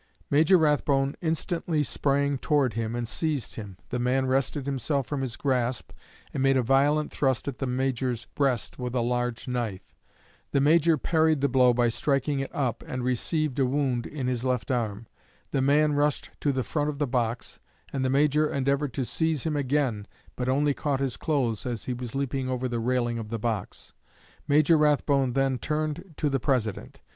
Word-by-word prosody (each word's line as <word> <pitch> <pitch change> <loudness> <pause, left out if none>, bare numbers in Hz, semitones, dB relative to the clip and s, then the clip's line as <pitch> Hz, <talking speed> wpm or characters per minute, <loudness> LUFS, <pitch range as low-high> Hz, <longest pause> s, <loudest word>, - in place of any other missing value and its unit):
Major 160 +6 +5
Rathbone 145 -3 +2
instantly 165 -1 -1
sprang 140 +1 0
toward 140 -6 +2
him 115 +1 -2
and 120 -1 -2
seized 145 -1 -2
him; 100 -5 -8
the 125 - -2
man 130 +2 +1
wrested 135 +2 0
himself 140 0 -1
from 145 -2 -3
his 125 -3 -3
grasp, 125 -3 -1 0.4
and 135 - -2
made 135 0 +4
a 130 - +2
violent 145 +5 +2
thrust 135 -3 0
at 140 - -4
the 135 - -1
Major's 125 -2 -1
breast 135 -4 0
with 125 0 -3
a 125 - +2
large 120 0 -1
knife. 120 -6 -4 0.6
The 140 - +4
Major 160 +3 +4
parried 160 +1 +2
the 140 - +2
blow 125 -1 +5
by 120 0 +2
striking 140 +3 0
it 135 - -3
up, 125 -5 -2
and 130 -1 -4
received 140 +3 -1
a 135 - +4
wound 130 -3 0
in 140 -4 -5
his 125 -1 -1
left 130 +1 -1
arm. 115 -3 -2 0.5
The 135 - +1
man 150 +2 +3
rushed 145 0 0
to 145 - +1
the 130 -1 -1
front 150 +2 -1
of 145 - -4
the 145 - +1
box, 120 -2 -2 0.3
and 135 -1 -1
the 130 - +1
Major 150 +2 +3
endeavored 140 0 0
to 130 - -1
seize 160 0 0
him 155 -2 -1
again, 130 -7 0 0.3
but 125 0 -2
only 145 +2 +2
caught 140 -1 -1
his 135 -5 -1
clothes 120 - -1
as 120 -4 -4
he 125 - -2
was 120 -1 -6
leaping 135 -1 -2
over 130 0 -1
the 120 -1 -2
railing 120 0 0
of 110 -1 -6
the 115 - -2
box. 110 -3 -4 0.5
Major 155 +2 +4
Rathbone 140 -3 +2
then 135 -1 +1
turned 155 - -3
to 150 - 0
the 135 -1 0
President. 115 -6 -2
135 Hz, 190 wpm, -27 LUFS, 125-145 Hz, 0.6 s, Major